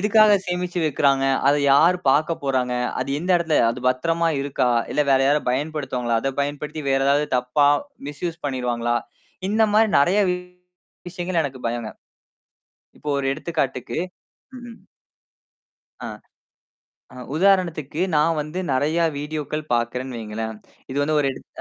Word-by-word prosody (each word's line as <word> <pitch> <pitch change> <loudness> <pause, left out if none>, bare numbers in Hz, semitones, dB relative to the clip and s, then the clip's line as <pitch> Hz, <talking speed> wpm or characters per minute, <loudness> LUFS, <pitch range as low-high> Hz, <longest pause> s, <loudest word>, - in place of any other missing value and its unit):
எதுக்காகச் 210 -1 +4
சேமிச்சு 180 0 -2
வைக்கிறாங்க? 140 -2 +2 0.2
அத 145 - +4 0.2
யாரு 170 +6 +5
பார்க்கப்போறாங்க? 135 -4 0 0.3
அது 130 - -3
எந்த 180 +3 -3
இடத்துல 165 -3 +1
அது 120 +2 -6
பத்திரமா 165 +6 +1
இருக்கா? 140 -3 0 0.2
இல்ல, 150 - +2
வேற 135 - +5
யாராவது 145 -1 +1
பயன்படுத்துவாங்களா? 130 -4 -1
அதப் 135 0 -3
பயன்படுத்தி 150 +2 -4
வேற 135 0 +2
ஏதாவது 145 +2 +3
தப்பா 125 +4 +2 0.4
மிஸ்யூஸ் 160 +3 -5
பண்ணிருவாங்களா? 120 -3 -1 0.5
இந்தமாரி 215 +1 +3
நிறைய 180 +8 +3 0.9
விஷயங்கள் 175 -2 -1
எனக்குப் 130 -3 -5
பயம்ங்க. 115 -2 -4 1.1
இப்போ 150 - -4
ஒரு 140 - -2
எடுத்துக்காட்டுக்கு 140 -5 -3 0.6
ம், 245 - -11
ம். 225 - -14 1.2
ஆ. - - -4 1.1
அ - - -14 0.2
உதாரணத்துக்கு 170 -4 +1 0.2
நான் 160 +2 +2
வந்து 150 +4 -5
நிறையா 155 +6 +1
வீடியோக்கள் 150 0 -4
பார்க்கிறேன் 120 +2 -1
வைங்களேன்! 110 0 -5 0.3
இது 135 - -2
வந்து 155 +2 +1
ஒரு 145 - 0
எடுத் - - -13
145 Hz, 130 wpm, -22 LUFS, 130-170 Hz, 1.2 s, யாரு